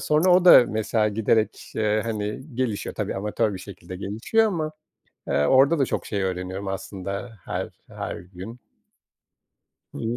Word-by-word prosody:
sonra 155 +5 +3
o 180 0 +5
da, 175 -8 +10
mesela, 110 0 +1
giderek, 110 +1 0
eee, 110 0 +2
hani, 105 -1 -3
gelişiyor, 120 -5 -2
tabii - - -3
amatör 105 +1 0
bir - - -6
şekilde 90 -2 -9
gelişiyor 115 - +1
ama, 155 -6 -2 0.6
eee, 75 - +2
orada 140 +4 +5
da 135 - +4
çok - - -3
şey 100 -3 -2
öğreniyorum 95 +1 -3
aslında 100 +3 -5
her - - -3 0.2
her - - -5
gün. 95 +7 -10 1.3
Hı - - -8
hı. 115 +1 -2
110 Hz, 155 wpm, -24 LUFS, 95-125 Hz, 1.3 s, da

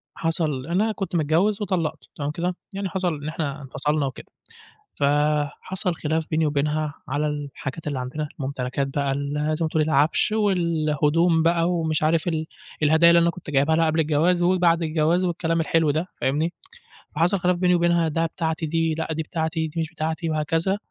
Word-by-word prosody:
حصل 155 -5 -1
أنا 205 +6 +1
كنت 195 -4 -4
متجوّز 170 +7 +2
وطلّقت 165 -6 -1 0.2
تمام 145 0 -3
كده؟ 175 +3 -2 0.2
يعني 195 -1 -3
حصل 180 -2 -1
إن 145 +1 -7
إحنا 150 -2 -3
انفصلنا 145 +2 -1
وكده. 135 - -6 0.8
فحصل 150 +6 0
خلاف 160 0 -1
بيني 155 0 +2
وبينها 150 +1 -1
على 145 +3 0
الحاجات 145 0 -5
اللي 145 -3 -2
عندنا، 140 +4 -4
ممتلكات 135 0 -2
بقى 140 0 -1
ال 140 +1 -3 0.2
زي 165 - 0
ما - - +1
تقول 155 0 +1
العفش، 150 +7 +2
والهدوم 165 -4 +2
بقى، 170 +1 +2
ومش 160 -3 0
عارف 160 +2 +2
ال 160 -2 -1 0.4
الهدايا 160 +3 +6
اللي 170 0 +6
أنا 170 - +3
كنت 170 -4 -9
جايبها 145 +3 +3
لها 165 0 +3
قبل 160 +1 +2
الجواز، 160 +4 +2
وبعد 175 -2 +3
الجواز 160 +3 +1
والكلام 165 -1 0
الحلو 165 -1 +2
ده 155 +5 0
فاهمني؟ 155 +6 0 0.6
فحصل 175 +4 +2
خلاف 180 0 +2
بيني 180 0 +3
وبينها 170 -1 +2
ده 165 +1 0
بتاعتي 160 0 -2
دي 165 +1 0
لأ 160 0 -3
دي 160 +1 -2
بتاعتي، 160 0 -2
دي 165 +2 -3
مش 160 - -2
بتاعتي، 160 +1 -3
وهكذا، 165 +5 0
160 Hz, 175 wpm, -24 LUFS, 150-170 Hz, 0.8 s, الهدايا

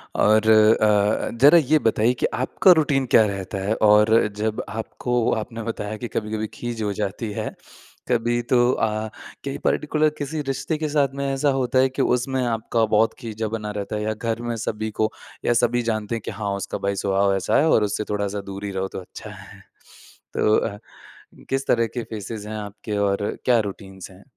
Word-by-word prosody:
और 110 +1 +4
अ, 105 -1 +4
ज़रा 145 +5 +8
ये 155 0 +3
बताइए 115 -1 +2
कि - - +2
आपका 130 +8 +3
रूटीन 145 -5 +3
क्या 110 - +7
रहता 100 -1 -4
है, 110 - +2
और 105 +1 +5 0.2
जब 110 0 -2
आपको 120 +2 -1
आपने 115 +1 -5
बताया 110 -1 -4
कि 120 - -5
कभी-कभी 110 -1 -3
खीज 120 -2 -5
हो 105 -1 -1
जाती 105 +2 -3
है। - - -3 0.6
कभी 120 0 +1
तो 120 +1 +2
अ, 110 -2 -1 0.4
क्या 140 - -3
ये - - -5
पार्टिकुलर 155 +1 +2
किसी 150 +2 -3
रिश्ते 135 +4 -2
के 155 0 -2
साथ 145 -2 +1
में 140 0 -3
ऐसा 140 +2 +1
होता 130 0 +1
है 130 0 +4
कि 130 - -3
उसमें 130 +1 +1
आपका 115 0 0
बहुत 110 +1 +2
खीजा 110 -2 -4
बना 105 -1 -4
रहता 100 +1 -4
है, 105 - -2
या 110 0 -1
घर 115 +1 -3
में 120 -1 -3
सभी 110 -1 -3
को 110 0 +2 0.3
या - - +3
सभी 120 +1 +2
जानते 110 +1 -3
हैं 115 - -4
कि - - -3
हाँ 100 -1 -3
उसका 100 - -4
भाई 100 0 -2
स्वभाव 100 0 +1
ऐसा 95 - +1
है 160 - +3
और 110 - +4
उससे 105 +1 -1
थोड़ा-सा 100 0 -2
दूर 100 +1 -6
ही 100 - -3
रहो 95 0 -2
तो - - -7
अच्छा 90 - -10
है। - - -12 0.7
तो 105 - +3
अ, 100 -2 -2 0.7
किस 135 0 -1
तरह 115 -1 +2
के 120 - -2
फेसेज 105 0 -6
हैं 110 +1 -5
आपके 105 0 -6
और 100 0 0
क्या 125 -2 +4
रुटिन्स 95 -2 -7
हैं? 95 +1 -16
110 Hz, 200 wpm, -23 LUFS, 105-120 Hz, 0.7 s, ज़रा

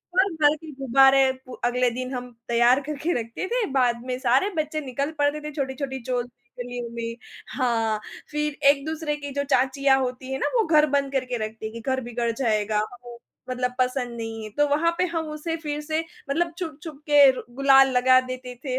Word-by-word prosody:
भर-भर 320 -6 +3
के 310 0 -11
गुब्बारे 270 0 +5
पू 255 - -10
अगले 245 0 +2
दिन 255 +2 -5
हम 250 0 -6 0.2
तैयार 240 +3 +4
करके 305 +4 -1
रखते 230 +11 -5
थे 480 +1 0
बाद 245 -3 +2
में 255 -1 -2
सारे 265 +10 +2
बच्चे 310 0 -1
निकल 280 +4 -2
पड़ते 290 +1 +1
थे - - -5
छोटी-छोटी 265 -1 -3
चॉल 245 -1 -1 0.4
गलियों 245 -1 -5
में। 230 0 -4 0.4
हाँ, 225 -4 +1 0.3
फिर 300 -1 -2
एक-दूसरे 300 +2 0
की 285 -1 -7
जो 280 - -1
चाचियाँ 270 0 +2
होती 255 0 -4
है 265 - -1
ना, - - +1
वो 445 - +3
घर 305 -2 +5
बंद 275 -1 -2
करके 255 -2 -1
रखती 220 0 -8
हैं 220 - -5
कि 230 - -7
घर 260 - 0
बिगड़ 235 -1 -1
जाएगा, 215 -3 0
हमें 240 +2 -5 0.3
मतलब 250 0 -1
पसंद 250 -1 0
नहीं 225 -1 -5
है, 215 - -7
तो 295 +7 +1
वहाँ 325 +4 +2
पे 365 - +2
हम 325 -1 -1
उसे 305 +2 -4
फिर 295 0 -3
से 310 +1 -2 0.3
मतलब 335 +4 0
छुप-छुप 315 -4 -7
के 290 -2 +8
रु 255 - -6
गुलाल 270 -1 +6
लगा 255 +1 +6
देते 255 -1 -6
थे, 260 -1 -1
265 Hz, 195 wpm, -24 LUFS, 245-295 Hz, 0.4 s, के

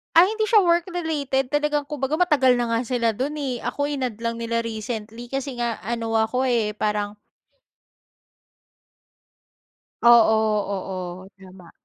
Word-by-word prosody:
Ay, 365 +5 +7
hindi 435 -1 -1
siya 435 -4 +5
work 340 0 +2
related 280 -6 -1
talagang 295 0 +1
kung 290 -1 -7
baga 270 +3 0
matagal 295 -8 +4
na 240 -1 -1
nga 230 - +2
sila 235 -2 +1
dun 270 +7 -3
eh, 265 -5 -3
ako 285 - -3
in-add 265 -6 -2
lang 230 0 -2
nila 230 0 -1
recently, 225 +1 -6
kasi 270 -1 -4
nga 235 -2 -1
ano 230 0 -2
ako 250 +4 +1
eh, 230 -4 +1
parang 210 -1 -2 2.9
Oo, 220 -2 +5
oo. 185 -1 -5
Tama. 185 -3 -15
240 Hz, 140 wpm, -23 LUFS, 220-285 Hz, 2.9 s, Ay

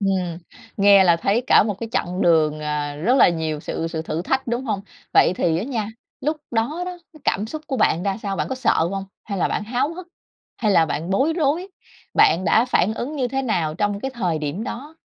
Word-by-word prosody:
Ừm, 185 -4 -1 0.4
nghe 200 -1 +6
là 170 -2 +5
thấy 205 +8 +1
cả - - +6
một 210 -1 -2
cái 230 - -4
chặng 180 -2 -1
đường, 155 -3 +3
à, 150 -1 -3
rất 230 - +2
là - - +7
nhiều 160 -3 -2
sự 165 - -3
sự 160 -1 -4
thử 160 +1 -3
thách, 265 +6 -1
đúng 240 +3 -2
hông? 210 -5 -2 0.3
Vậy - - +6
thì 165 -1 +1
á 210 - -2
nha, 225 -6 -3 0.3
lúc 305 +2 -1
đó 240 +9 -1
đó, 360 -1 -6
cái 310 - -16
cảm 205 +3 0
xúc 310 +6 -6
của 270 -5 -2
bạn 175 -5 +2
ra 195 -1 -1
sao? 195 -1 -2
Bạn - - -2
có 265 - -2
sợ 210 -9 +2
hông? 195 0 -3 0.2
Hay 200 -3 -4
là - - +1
bạn - - -2
háo 255 +8 -1
hức, 365 0 -9 0.5
hay 210 -3 +2
là 165 -3 +5
bạn 160 +5 -3
bối 270 +12 +2
rối? 320 +3 0 0.5
Bạn 170 +4 +4
đã 220 +7 +4
phản 220 -4 +1
ứng 290 +7 -4
như 255 -3 0
thế 270 +2 -2
nào 170 -10 -1
trong 205 +1 -1
cái 270 - -3
thời 180 -9 -1
điểm 150 +8 -3
đó? 275 +6 -7
205 Hz, 235 wpm, -22 LUFS, 170-255 Hz, 0.5 s, là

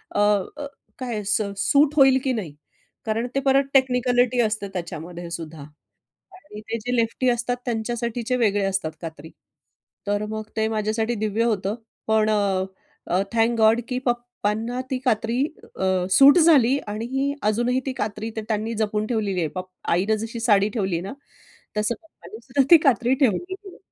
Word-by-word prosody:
अ, - - +1
अ, 205 +7 +1 0.3
काय 235 -5 -3
स 210 +2 +1 0.2
सूट 285 +8 +3
होईल 270 -2 +6
की 265 - +1
नाही. 180 -11 -5 0.5
कारण 225 +2 -1
ते - - +3
परत 275 0 +3
टेक्निकलिटी 250 -2 +3
असते 215 -2 -1
त्याच्यामध्येसुद्धा. 170 -2 -6 0.7
आणि 300 - -12
ते 230 - -1
जे 245 +3 -2
लेफ्टी 235 +2 +1
असतात 240 0 0
त्यांच्यासाठीचे 235 +1 -2
वेगळे 205 -4 +2
असतात 190 -4 -1
कात्री. 160 -2 -8 0.8
तर 205 +1 0
मग 215 0 -4
ते 220 0 +2
माझ्यासाठी 220 +2 -1
दिव्य 215 +2 0
होतं. 210 -3 0 0.3
पण 220 0 +3
अ, 200 -3 +1 0.4
अ, 180 +2 +1
थँक 230 +1 +2
गॉड 220 +2 +5
की 250 -1 -2
पप्पांना 240 -1 -2
ती 260 - +1
कात्री 235 +2 +1 0.3
अ, 190 -1 0
सूट 280 - +8
झाली 280 -6 +5
आणि 260 +7 -2
अजूनही 240 +4 +1
ती 265 - -2
कात्री 215 -1 -4
ते 220 - -2
त्यांनी 220 +1 -1
जपून 215 -1 -1
ठेवलेली 210 -5 -1
आहे 165 - 0
पप 185 0 -5 0.3
आईनं 200 +5 +1
जशी 235 +1 -7
साडी 210 -3 +3
ठेवली 195 -6 -1
आहे 165 - -2
ना, 195 - -6 0.6
तसं 210 +3 +1
पप्पानेसुद्धा 270 -4 -3
ती 340 - +11
कात्री 245 -1 +3
ठेवलेली 270 - +1
आहे. 390 -1 -11
225 Hz, 160 wpm, -23 LUFS, 205-250 Hz, 0.8 s, ती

